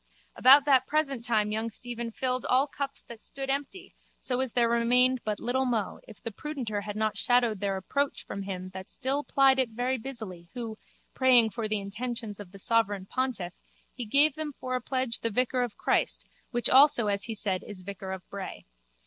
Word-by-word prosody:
About 275 +2 +7
that 260 -3 +4
present 280 -5 0
time 215 -3 +1
young 220 +2 -1
Stephen 235 +1 -4
filled 255 +2 -2
all 260 +2 +4
cups 275 -1 -5
that 235 -1 -12
stood 270 0 -3
empty 290 +7 -4 0.3
so 250 -1 -1
as 260 -3 -1
there 240 -1 +3
remained 245 +2 +3
but 210 -1 -2
little 260 +2 0
mo 225 -5 -1
if 215 -4 -13
the 230 - -6
prudenter 240 -5 -4
had 205 0 -6
not 215 0 -1
shadowed 240 -4 +2
their 195 -1 -1
approach 280 +9 -2
from 200 - -5
him 185 -1 -5
that 190 0 -9
still 275 +3 -1
plied 270 -2 +4
it 255 -3 +2
very 245 +3 -1
busily 220 -9 -8
who, 230 -3 -4 0.4
praying 245 -4 +5
for 230 -1 -3
the 215 -1 0
intentions 215 +1 -5
of 200 -3 -10
the 195 - -12
sovereign 205 -2 +1
pontiff, 230 -7 -2 0.4
he 250 - -5
gave 285 +6 +5
them 305 0 -5
for 255 0 -4
a 255 - 0
pledge 255 -2 -1
the 230 - 0
vicar 250 +3 +1
of 245 -3 -3
Christ - - +1 0.2
which 240 -1 +1
also 270 -3 +6
as 200 -1 0
he 225 - -4
said 195 -3 0
is 190 -3 -8
vicar 190 0 -6
of 190 -1 -7
Bray. 200 -1 -7
235 Hz, 200 wpm, -28 LUFS, 210-260 Hz, 0.4 s, About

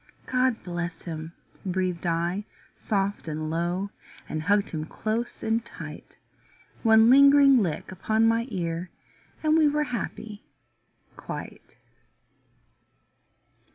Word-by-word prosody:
"God 255 -2 +1
bless 175 -1 -4
him," 160 -1 -6 0.3
breathed 185 -2 -1
I 170 +4 -1 0.3
soft 200 -3 -2
and 155 0 -3
low, 175 +4 -1 0.4
And 155 - -3
hugged 200 +5 +2
him 155 -2 -3
close 220 +7 -3
and 225 +1 +1
tight. 230 - -10 0.6
One 220 -1 +6
lingering 280 -1 +7
lick 180 -5 -2
upon 220 +4 +1
my 230 +1 +2
ear 175 -3 -3 0.5
And 310 0 +4
we 315 -2 +5
were 300 +1 +1
happy 225 -5 -5 0.7
quite. - - -8
200 Hz, 110 wpm, -26 LUFS, 170-230 Hz, 0.7 s, lingering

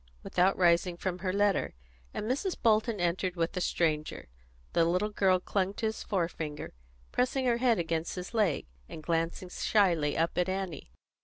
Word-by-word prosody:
without 185 +2 +2
rising 175 0 +3
from 180 0 -3
her 185 0 -1
letter, 200 - +1 0.4
and - - -4
Mrs. 280 - -1
Bolton 220 -1 +2
entered 175 +1 0
with 165 +1 -1
a 180 - -1
stranger. 155 - -1 0.4
The 170 - +4
little 180 +5 +1
girl 190 -3 +3
clung 195 +1 -1
to 225 - -3
his 220 0 -2
forefinger, 165 -6 -3 0.4
pressing 255 +1 +1
her 240 -2 +3
head 240 -2 +3
against 165 -1 -2
his 180 +4 -6
leg, 205 -10 +1 0.2
and 155 - -8
glancing 165 +2 -1
shyly 175 -7 +2
up 165 +1 +1
at 180 +1 +1
Annie. 185 - -4
185 Hz, 165 wpm, -30 LUFS, 170-205 Hz, 0.4 s, The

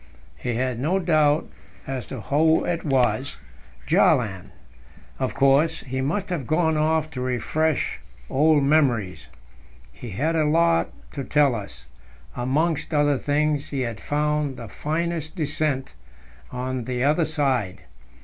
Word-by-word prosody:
We 120 -2 -1
had 125 -1 -1
no 160 +9 +1
doubt 155 -5 +2 0.4
as 130 -5 -5
to - - -6
who 160 +3 +2
it 170 -1 -2
was 130 -2 +1 0.5
Bjaaland, 95 -7 +2 0.7
of 130 -1 -2
course. 140 +4 +3
He 130 0 -4
must 185 +9 -2
have 160 -9 -3
gone 160 0 +2
off 155 0 +1
to 125 - -5
refresh 130 +5 -1 0.3
old 150 +1 +3
memories. 130 -10 +1 0.6
He 120 - -9
had 150 - -1
a 160 - +3
lot 165 +2 +3 0.2
to 140 - -5
tell 145 -1 +3
us; 105 -4 -7 0.5
amongst 150 +6 0
other 145 -2 +3
things, 145 0 0
he 140 -2 -2
had 115 -4 -3
found 150 -2 -1
"the 115 - -8
finest 160 - -3
descent" 150 -4 -2 0.6
on 125 -1 -3
the 125 -1 -2
other 155 +4 +3
side. 135 - -1
145 Hz, 135 wpm, -24 LUFS, 130-155 Hz, 0.7 s, course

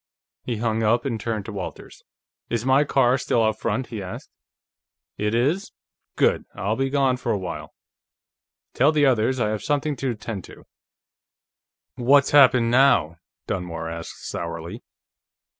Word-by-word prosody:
He 120 -3 -4
hung 110 0 -1
up, 115 +5 +2
and 115 -5 -2
turned 110 -2 -3
to 110 - -6
Walters. 95 -3 -8 0.5
"Is 120 0 -2
my 135 +2 +4
car 130 -3 +2
still 115 - +1
out 110 -1 0
front?" 115 +3 -1
he 105 - -4
asked. 95 -1 -8 0.9
"It 105 +1 0
is? 150 +12 0 0.4
Good. - - +2
I'll 100 +4 -1
be 135 +2 -1
gone 135 -2 +2
for - - -2
a - - +1
while; 95 -2 -7 1.0
tell 140 +5 +4
the 150 -2 +3
others 130 0 +2
I 105 -3 +1
have 110 -1 -3
something 145 0 -1
to 135 +1 -2
attend 110 -4 -5
to." - - -14 1.3
"What's 135 +3 +4
happened 125 -5 +6
now?" 120 - +4 0.3
Dunmore 85 -3 -4
asked 85 0 -8
sourly. 85 0 -5
115 Hz, 150 wpm, -23 LUFS, 105-135 Hz, 1.3 s, happened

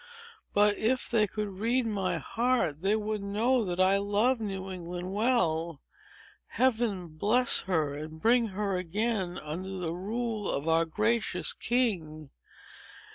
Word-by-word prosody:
"But, 205 0 +4
if 250 +3 0
they 215 -3 +3
could 210 +2 -3
read 235 +3 +1
my 200 -4 -1
heart, 230 - 0
they 200 +3 +2
would 215 -1 -2
know 225 +5 +1
that 180 -2 -3
I 190 +1 +5
love 210 +5 +1
New 195 -3 -4
England 180 +1 -6
well. 170 - +1 0.7
Heaven 225 -8 0
bless 215 +11 +3
her, 155 -6 +1
and 155 +2 -7
bring 235 +4 +3
her 200 -1 -2
again 185 +1 -2
under 165 +5 -5
the 170 -3 -3
rule 215 +3 -3
of 140 +3 -2
our 165 0 +3
gracious 210 -1 0
king! 170 - -1
200 Hz, 135 wpm, -29 LUFS, 175-225 Hz, 0.7 s, I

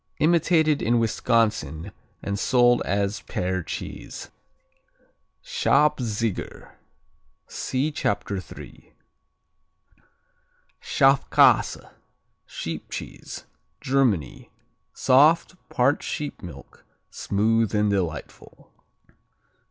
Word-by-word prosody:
Imitated 160 -2 +3
in 120 +1 +2
Wisconsin 110 -7 0 0.3
and 100 0 -3
sold 120 0 +3
as 100 0 -1
Pear 95 0 -2
cheese. - - -7 1.1
Schabziger 115 -8 0 0.7
see 135 +4 -2
Chapter 100 -7 -2
3. - - -13 1.9
Schafkäse 135 +1 +3 0.6
(Sheep - - -6
Cheese) - - -8 0.3
Germany 120 - 0 0.4
Soft; 155 +8 +4 0.2
part 135 +2 +2
sheep 150 -1 -5
milk; 90 - -12 0.3
smooth 110 +1 0
and 105 0 +2
delightful. 85 -6 -5
115 Hz, 70 wpm, -24 LUFS, 100-135 Hz, 1.9 s, Soft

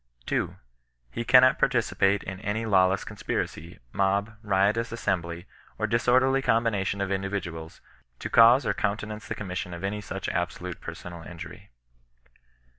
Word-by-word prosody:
2. - - -1 0.6
He 120 - -3
cannot 130 +2 +6
participate 100 -6 +2
in 95 0 -6
any 110 +2 -2
lawless 95 -2 +3
conspiracy, 85 +3 -4 0.2
mob, 100 +2 0
riotous 105 +3 +1
assembly, 85 -7 -2 0.3
or - - 0
disorderly 130 +3 +3
combination 105 -5 +1
of 100 0 -1
indi 95 0 -1
viduals, 85 -5 -6 0.4
to - - -5
cause 120 +3 +6
or - - +1
countenance 105 +1 -3
the - - -3
commission 90 -3 -5
of 85 - -9
any 105 +2 -2
such 95 -2 -5
absolute 90 0 -3
personal 85 -1 -8
injury. 85 0 -10
100 Hz, 135 wpm, -27 LUFS, 95-115 Hz, 0.6 s, cannot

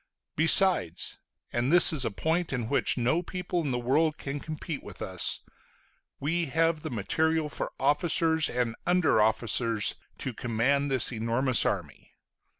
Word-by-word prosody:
Besides 165 - +4 0.3
and 120 +4 -1
this 175 -1 +8
is 145 -4 +2
a - - -1
point 160 - -2
in 120 -4 -3
which 140 - +1
no 130 +8 0
people 180 0 -4
in 150 - -3
the 125 - -1
world 150 +6 0
can 140 +1 -6
compete 155 0 -7
with 100 - -12
us 95 -1 0 0.8
we 165 +4 -1
have 160 +2 0
the 155 - -5
material 160 +7 -1
for - - -5
officers 160 +2 +1
and 120 -2 -2
under 175 -10 +2
officers 110 0 +1 0.2
to 130 - -5
command 125 +6 -1
this 130 -3 +3
enormous 115 +3 0
army. - - -6
140 Hz, 150 wpm, -27 LUFS, 120-160 Hz, 0.8 s, this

